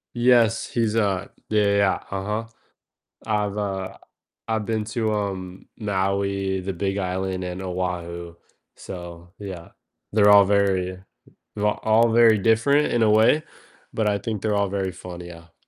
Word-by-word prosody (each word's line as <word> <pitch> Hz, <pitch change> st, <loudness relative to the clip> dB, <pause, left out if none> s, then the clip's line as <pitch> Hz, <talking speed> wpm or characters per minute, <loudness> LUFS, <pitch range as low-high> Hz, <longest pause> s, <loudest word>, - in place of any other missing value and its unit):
Yes, 120 Hz, -2 st, +3 dB
he's, 115 Hz, -2 st, -1 dB
uh 100 Hz, -5 st, 0 dB, 0.2 s
Yeah, 105 Hz, -1 st, +3 dB
yeah, 100 Hz, 0 st, +2 dB
yeah, 100 Hz, -2 st, +2 dB
uh-huh. 105 Hz, +4 st, -3 dB, 0.8 s
I've, 105 Hz, -2 st, -1 dB
uh 95 Hz, -2 st, -3 dB, 0.5 s
I've 110 Hz, -1 st, -1 dB
been 110 Hz, -1 st, -1 dB
to, 110 Hz, -2 st, 0 dB
um, 95 Hz, -3 st, -4 dB
Maui, 100 Hz, -2 st, -1 dB
the 95 Hz, +1 st, -4 dB
Big 95 Hz, +2 st, -2 dB
Island, 95 Hz, 0 st, -2 dB
and 90 Hz, +1 st, -5 dB
Oahu, 85 Hz, -2 st, -4 dB, 0.4 s
so 85 Hz, -1 st, -9 dB
yeah. 95 Hz, -4 st, -8 dB, 0.4 s
They're 105 Hz, -1 st, +5 dB
all 100 Hz, -1 st, +8 dB
very 95 Hz, -2 st, +1 dB, 0.5 s
va 105 Hz, 0 st, +2 dB
all 110 Hz, +1 st, +4 dB
very 115 Hz, -2 st, +6 dB
different 115 Hz, +8 st, +3 dB
in 120 Hz, -, +2 dB
a 110 Hz, -, +4 dB
way, 110 Hz, +8 st, +4 dB, 0.5 s
but 110 Hz, -2 st, +1 dB
I 100 Hz, -1 st, +1 dB
think 105 Hz, 0 st, -4 dB
they're 105 Hz, -1 st, 0 dB
all 100 Hz, -1 st, +1 dB
very 95 Hz, -1 st, -2 dB
fun, 90 Hz, 0 st, -9 dB
yeah. 85 Hz, -1 st, -12 dB
100 Hz, 150 wpm, -23 LUFS, 95-110 Hz, 0.8 s, all